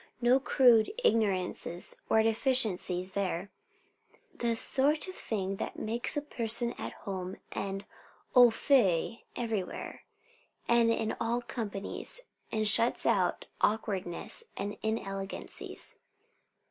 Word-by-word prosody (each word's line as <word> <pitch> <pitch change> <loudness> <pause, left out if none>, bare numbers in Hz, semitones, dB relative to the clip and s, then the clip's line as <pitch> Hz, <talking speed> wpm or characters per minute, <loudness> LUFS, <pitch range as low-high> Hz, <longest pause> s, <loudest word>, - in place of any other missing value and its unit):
No 245 +2 +4
crude 245 -4 +4
ignorances 185 - 0
or 220 - +4
deficiencies 215 -6 +1
there. 190 -1 -3 0.8
"The 235 -1 -1
sort 285 +8 +1
of 370 - -7
thing 195 - -4
that - - -5
makes 235 +6 0
a 290 - -1
person 235 -3 -1
at - - -5
home 190 -2 -5
and 195 0 -4 0.5
au 245 -1 +8
fait 225 - +1
everywhere, 220 -6 -4 0.7
and 235 -1 +4
in 225 -1 -1
all 235 +1 -1
companies, 215 - -3 0.3
and 215 -1 0
shuts 230 +3 +8
out - - +1 0.2
awkwardnesses 205 - -1
and 200 +1 -4
inelegancies. 195 -3 -4
220 Hz, 110 wpm, -30 LUFS, 195-240 Hz, 0.8 s, au